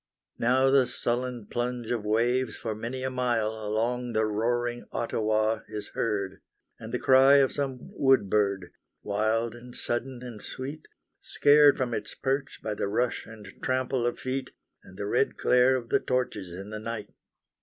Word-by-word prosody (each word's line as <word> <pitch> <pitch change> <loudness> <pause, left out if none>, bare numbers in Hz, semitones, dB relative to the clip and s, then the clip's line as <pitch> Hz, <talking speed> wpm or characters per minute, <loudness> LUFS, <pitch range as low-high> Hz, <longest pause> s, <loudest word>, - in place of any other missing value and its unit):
Now 130 +3 +3
the 135 -2 +5
sullen 120 -1 -1
plunge 120 +1 -3
of 120 -3 -1
waves 120 +4 +1
for 110 - -3
many 120 +4 -5
a 130 - -1
mile 120 -4 0
Along 120 +3 -1
the 110 0 +2
roaring 120 +3 -1
Ottawa 110 -1 0
is 105 -1 -6
heard, 100 -3 -2 0.4
And 110 - -8
the 125 - 0
cry 135 +2 +6
of 135 -2 +5
some 135 -3 -4
wood 135 -7 +3
bird, 100 -3 0 0.3
Wild 110 +3 0
and 120 +1 -11
sudden 125 +1 -3
and 120 -4 -8
sweet, 140 +4 -6 0.3
Scared 145 0 +5
from 125 -3 -1
its - - -4
perch 135 +1 -2
by 110 - -2
the 100 - -2
rush 120 +4 -1
and 110 -1 -11
trample 130 -1 0
of 120 - -2
feet, 130 0 -3 0.3
And 95 - -15
the 100 - -3
red 125 +6 +1
glare 125 +1 +4
of 120 -3 -4
the - - +3
torches 125 -8 -2
in 95 +4 -8
the 110 - -5
night. 110 -1 -6
120 Hz, 165 wpm, -28 LUFS, 110-130 Hz, 0.4 s, cry